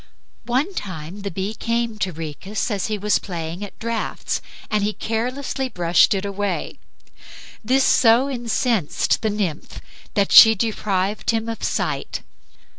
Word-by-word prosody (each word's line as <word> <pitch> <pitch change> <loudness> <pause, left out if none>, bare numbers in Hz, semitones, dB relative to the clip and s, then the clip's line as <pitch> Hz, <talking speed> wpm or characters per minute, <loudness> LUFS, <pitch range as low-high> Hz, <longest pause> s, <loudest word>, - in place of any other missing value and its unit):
One 265 +11 0
time 185 - -6
the 200 - -3
bee 195 +3 -3
came 230 0 -2
to 190 - 0
Rhoecus 165 +8 -4
when 205 - -1
he 215 +1 -1
was 210 +1 +1
playing 170 0 -5
at 200 - -9
draughts 230 0 -3 0.3
and 210 -1 +1
he 210 +1 0
carelessly 255 +5 -2
brushed 175 0 +3
it 195 +1 -2
away. 200 0 -3 0.8
This 260 +4 +3
so 240 +2 +5
incensed 235 - 0
the 220 - +1
nymph 195 -7 -3 0.4
that 200 -1 +2
she 225 -1 +10
deprived 205 -2 -1
him 225 0 +1
of 225 -1 -5
sight. - - -2
210 Hz, 140 wpm, -22 LUFS, 190-230 Hz, 0.8 s, she